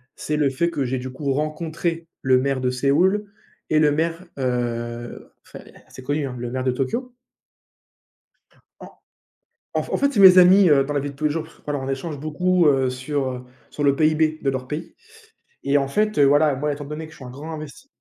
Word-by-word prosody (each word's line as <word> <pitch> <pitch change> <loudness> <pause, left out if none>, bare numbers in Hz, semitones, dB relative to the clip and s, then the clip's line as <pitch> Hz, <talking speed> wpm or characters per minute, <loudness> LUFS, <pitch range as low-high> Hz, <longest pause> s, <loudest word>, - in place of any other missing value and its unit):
c'est 150 0 -3
le 145 -2 +2
fait 170 +6 0
que 140 -5 -2
j'ai, 130 +1 -2
du 130 0 -6
coup, 135 0 -2
rencontré 165 +2 -3
le 130 -1 +3
maire 135 -1 -1
de 125 - +1
Séoul, 165 +11 +2 0.4
et 155 - +2
le 150 -1 +4
maire, 165 +4 -2
heu, 120 -2 -3
enfin, - - -11
c - - -17 0.2
c'est 130 - -11
connu, 145 +1 -1
hein, 125 -2 -6
le 120 0 -4
maire 130 +1 -3
de 130 - +1
Tokyo. 235 - -3 1.7
En - - -11 0.8
en - - +1
f - - -10
en - - +2
fait, 280 0 +1
c'est 205 - +1
mes 185 -1 +9
amis, 185 +1 +7
heu, 135 -2 +5
dans 145 +1 -4
la 140 - +1
vie 145 +1 -4
de 140 - -15
tous 155 - -6
les 150 - +3
jours 160 +1 -2
parce 160 - -16
que, - - -26
voilà, 145 -2 -3
on 135 - -5
échange 140 +2 -4
beaucoup, 175 +3 +1
heu, 135 -2 +2
sur, 130 +1 -3
heu, 125 0 -8 0.3
sur 145 - -5
le 140 -1 +3
PIB 155 0 +2
de 135 - +1
leur 130 -1 -5
pays 160 +3 -6 0.7
et 140 +1 +2
en 135 -1 0
fait, 210 +7 0
heu, 140 - +6
voilà, 145 0 +4
moi, 150 +2 -1
étant 145 0 -8
donné 150 +2 -6
que 155 - -14
je - - -15
suis 130 - -11
un - - -8
grand 145 +6 -8
invest 155 - -9
145 Hz, 235 wpm, -22 LUFS, 130-160 Hz, 1.7 s, mes